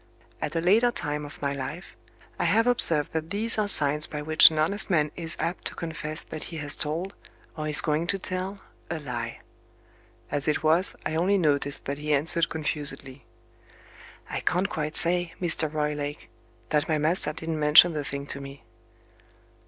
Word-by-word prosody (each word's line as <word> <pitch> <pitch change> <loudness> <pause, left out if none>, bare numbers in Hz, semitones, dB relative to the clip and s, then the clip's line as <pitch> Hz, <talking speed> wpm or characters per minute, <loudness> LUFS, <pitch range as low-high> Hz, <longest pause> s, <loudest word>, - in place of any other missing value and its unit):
At - - -4
a 165 - 0
later 215 +8 +3
time 150 -8 -4
of 145 - -12
my 140 0 -1
life, 140 +7 -8 0.4
I - - 0
have 225 - +2
observed 165 -11 +5
that 160 0 -4
these 220 +4 +1
are 210 - 0
signs 150 -4 +5
by 150 -1 -6
which 155 +1 +7
an 160 - -6
honest 200 +9 +1
man 150 -5 +1
is 165 -2 -4
apt 175 - -4
to - - -4
confess 155 -1 -6
that 155 - -8
he 165 - -8
has 145 -1 0
told, 165 +6 -3 0.4
or 155 -1 -5
is 150 - +6
going 155 +2 -1
to 195 - 0
tell, 190 +1 -5 0.3
a 170 - -3
lie. 120 -6 -6 0.9
As 145 0 -3
it 150 +1 -1
was, 165 +5 +2
I 155 - -3
only 180 +5 +1
noticed 145 -5 -1
that 140 +1 -5
he 150 0 0
answered 160 +3 +1
confusedly. 140 -4 -5 1.0
"I - - -4
can't 180 +2 -1
quite 155 0 -4
say, 175 0 +2
Mr. 160 -3 +2
Roylake, 150 -1 -4 0.4
that 150 +1 0
my 155 - +1
master 155 +1 +1
didn't 160 0 -5
mention 155 +3 +6
the 150 -1 -3
thing 140 0 -6
to 140 - -6
me." 140 -2 -11
155 Hz, 180 wpm, -25 LUFS, 150-175 Hz, 1.0 s, which